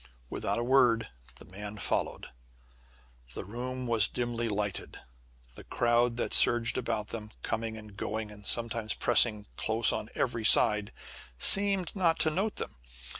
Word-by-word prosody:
Without - - -2
a 120 - -1
word 120 -3 +3 0.3
the - - -13
man 105 +3 -8
followed. - - -3 1.1
The - - -6
room 125 +5 -6
was 115 -4 +3
dimly 120 0 -3
lighted. 100 -2 -4 0.5
The - - -12
crowd 120 0 0
that - - -3
surged 120 -1 +4
about 110 -2 -3
them, 110 -2 -7
coming 110 0 -3
and 105 -2 -12
going, 105 +2 -4
and 105 0 -12
sometimes 115 0 +1
pressing 110 -3 +3
close 110 0 +3
on 110 - -5
every 115 -3 -2
side, 105 -1 +4 0.5
seemed 195 - +2
not 170 -4 +1
to 155 - +2
note 200 +7 -2
them. - - -7
115 Hz, 145 wpm, -29 LUFS, 105-120 Hz, 1.1 s, surged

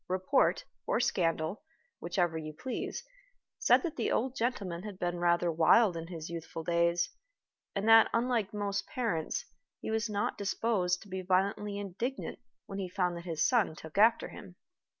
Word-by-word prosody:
Report, 185 +9 +2 0.2
or - - +2
scandal, 170 -5 0 0.4
whichever 175 -1 0
you 155 -1 -5
please, 255 - -4 0.6
said - - +5
that 335 -3 -4
the 235 - 0
old 255 +3 0
gentleman 200 -8 -2
had 205 -1 -7
been 175 -1 -2
rather 175 0 +2
wild 170 +5 +5
in 165 0 -5
his 165 -2 -6
youthful 165 -1 -6
days, 170 +1 +1 0.6
and 200 +2 -1
that, 225 0 +8
unlike 230 -3 +1
most 200 -1 -2
parents, 230 - -2 0.3
he - - -4
was 220 +1 0
not 205 0 -1
disposed 195 -3 0
to - - -16
be 190 -1 -4
violently 200 +2 0
indignant 205 +7 -4 0.3
when 195 - -6
he 185 -2 -3
found 180 -2 0
that 170 0 -8
his 160 -3 +1
son 220 -10 +2
took 160 +4 -6
after 225 +2 +5
him. - - -11
190 Hz, 165 wpm, -31 LUFS, 170-220 Hz, 0.6 s, that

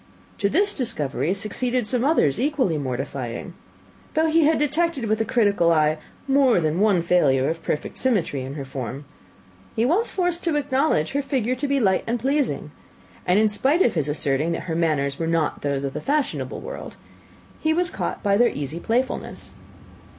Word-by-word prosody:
To 200 - +2
this 400 - +2
discovery 155 - -1
succeeded 240 +4 -1
some 245 +2 0
others 265 - +2
equally 260 - +1
mortifying. 130 +2 -4 0.6
Though 315 +1 +3
he 325 -1 +4
had 315 +1 +3
detected 295 -2 0
with 215 0 0
a - - +1
critical 205 -7 +2
eye 155 -1 +2 0.3
more 270 -6 +4
than 155 +1 0
one 200 -5 +3
failure 140 -7 +3
of 165 +1 -2
perfect 150 - -3
symmetry 200 - 0
in 135 +2 -6
her 140 -3 -5
form, 135 +1 -6 0.7
he 225 - +2
was 370 - +2
forced 355 -2 -1
to 330 -3 +1
acknowledge 275 - +1
her 280 - 0
figure 255 -4 -1
to 265 +3 -2
be 280 0 +1
light 190 -6 +2
and 235 +1 0
pleasing; 275 +3 -1 0.6
and 180 - +4
in 215 +1 +5
spite 270 - +2
of 230 - +2
his 155 -4 0
asserting 145 +2 0
that - - -3
her 165 - -4
manners 145 -4 0
were 165 - -1
not 165 -2 0
those 140 -1 -1
of 135 -1 -3
the - - -4
fashionable 290 0 -1
world, - - -8 0.6
he 315 - +1
was 345 +1 +1
caught - - -4
by 200 -1 +3
their 240 +2 +5
easy 145 +3 -5
playfulness. 245 +7 -2
210 Hz, 180 wpm, -23 LUFS, -, 0.7 s, in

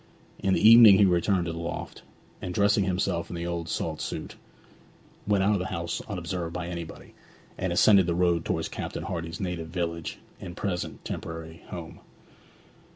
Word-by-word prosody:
In 95 -1 +2
the 110 - +4
evening 115 -3 +10
he 100 - +6
returned 90 0 +2
to 85 - -2
the 85 - -6
loft, 85 0 -6 0.4
and 90 - -5
dressing 100 -1 +3
himself 90 -2 -1
in - - -6
the 85 0 -4
old 85 -1 -3
salt - - -3
suit, - - -5 0.9
went 100 -2 +3
out 105 +2 +3
of 100 - +1
the 90 - -3
house 85 0 -3
unobserved 90 -3 -4
by 85 -1 -4
anybody, 85 -2 -8 0.4
and 95 - -2
ascended 95 +1 +5
the 85 - 0
road 85 -2 +2
towards - - -1
Captain - - -5
Hardy's 80 -3 -5
native 90 -3 -3
village 85 -1 -4 0.2
and 85 +2 -8
present 95 -4 -4
temporary 80 0 -6
home. 85 -3 -8
90 Hz, 170 wpm, -27 LUFS, 85-95 Hz, 0.9 s, evening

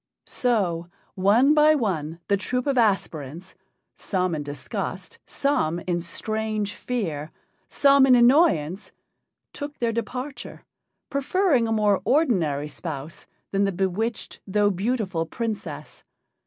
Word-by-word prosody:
So, 185 -9 0 0.3
one 220 +10 +4
by 305 0 +5
one, 170 - -2
the 200 - +3
troupe 250 +5 -2
of 280 -2 +1
aspirants 180 - -1 0.5
some 185 -2 -1
in 155 - -2
disgust, 145 -2 -5
some 255 - 0
in 175 -1 -1
strange 215 +3 -2
fear, 165 -12 -3 0.4
some 275 -1 +5
in 255 - +7
annoyance 235 - +3 0.6
took 290 0 -7
their 235 -1 0
departure, 250 +5 -5 0.5
preferring 280 -2 +2
a - - -2
more 210 -3 +2
ordinary 185 - +1
spouse 150 -1 -6 0.2
than 195 0 +1
the 195 - 0
bewitched 195 +5 -2
though 205 +1 +2
beautiful 190 -4 -1
Princess. 180 - -5
205 Hz, 115 wpm, -24 LUFS, 170-250 Hz, 0.6 s, in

